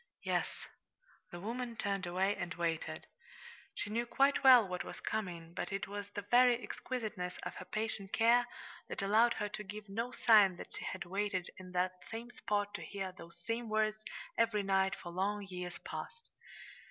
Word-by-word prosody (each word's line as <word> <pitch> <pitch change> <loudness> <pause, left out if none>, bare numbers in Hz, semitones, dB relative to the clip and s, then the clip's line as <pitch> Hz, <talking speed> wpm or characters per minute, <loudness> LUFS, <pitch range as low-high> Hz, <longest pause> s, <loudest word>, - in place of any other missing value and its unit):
"Yes." - - -1 0.6
The 175 -2 -7
woman 235 +4 -3
turned 195 -3 -1
and 180 0 0
waited. 165 -2 -2 0.7
She 205 - -4
knew 235 +2 0
quite 275 +3 +3
well 250 -5 +9
what 180 -1 -3
was - - -8
coming, 175 -6 -3
but 175 0 -3
it 195 -2 -2
was 205 0 -5
the 205 0 -5
very 245 0 +7
exquisiteness 210 -7 -4
of - - -4
her - - -7
patient 215 -2 -3
care 235 +2 +5 0.4
that - - -3
allowed 225 +4 +5
her 210 - -2
to 210 - -5
give 210 +1 -8
no 230 +5 -2
sign 210 -8 +6
that - - -9
she - - -5
had 185 - -4
waited 190 -1 -1
in 185 -1 -10
that 180 0 0
same 230 +2 -6
spot 205 -3 -1
to - - -4
hear 195 -2 -4
those 170 -1 -13
same 230 0 -2
words 215 0 +1 0.4
every 220 -3 +3
night 195 0 +2
for 175 -2 -8
long 200 +3 -1
years 180 -2 -5
past. 465 0 -7
205 Hz, 175 wpm, -35 LUFS, 185-225 Hz, 0.7 s, well